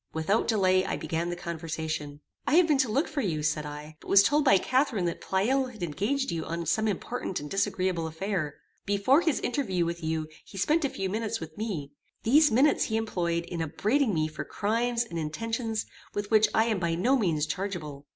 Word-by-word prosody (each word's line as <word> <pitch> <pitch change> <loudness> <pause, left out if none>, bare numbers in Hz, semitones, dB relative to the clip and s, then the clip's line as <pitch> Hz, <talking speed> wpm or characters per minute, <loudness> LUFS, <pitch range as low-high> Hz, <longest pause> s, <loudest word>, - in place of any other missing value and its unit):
Without 165 +8 +1
delay 185 -4 +3
I - - -2
began 165 +2 -2
the 175 - -2
conversation. 160 -3 -4 0.3
"I 290 - +3
have 355 +1 +7
been 295 -4 +3
to 260 -3 +2
look 280 +8 +1
for 305 -3 -2
you," 160 - -1
said 150 0 0
I, 150 +1 -9
"but - - -15
was 200 0 +7
told 295 +5 +3
by 230 -9 +6
Catharine 255 -2 +1
that 170 - -3
Pleyel 255 +8 +1
had 220 -7 -8
engaged 205 - -1
you 165 -1 -2
on 170 +1 -4
some 215 +8 +1
important 205 0 -3
and 145 - -7
disagreeable 185 -4 0
affair. 160 -2 -3 0.3
Before 205 +10 +4
his 325 -5 +1
interview 195 -10 0
with 170 0 -4
you 160 -1 -1 0.2
he 195 - -12
spent 305 - +2
a 280 - +1
few 195 - -3
minutes 220 +3 -2
with 160 -1 -8
me. 185 -11 -4 0.3
These 295 +6 +5
minutes 270 +6 +4
he 220 - -1
employed 170 -6 -1
in 170 -1 -4
upbraiding 215 - +1
me 155 -4 +1
for 155 - -6
crimes 230 +3 0
and 170 -8 -5
intentions 225 +8 -2 0.3
with 205 +1 -3
which 215 0 +6
I 220 - +3
am 220 -4 0
by 170 -2 0
no 240 +11 +3
means 165 - +1
chargeable. 155 -5 -5
195 Hz, 205 wpm, -28 LUFS, 160-230 Hz, 0.3 s, have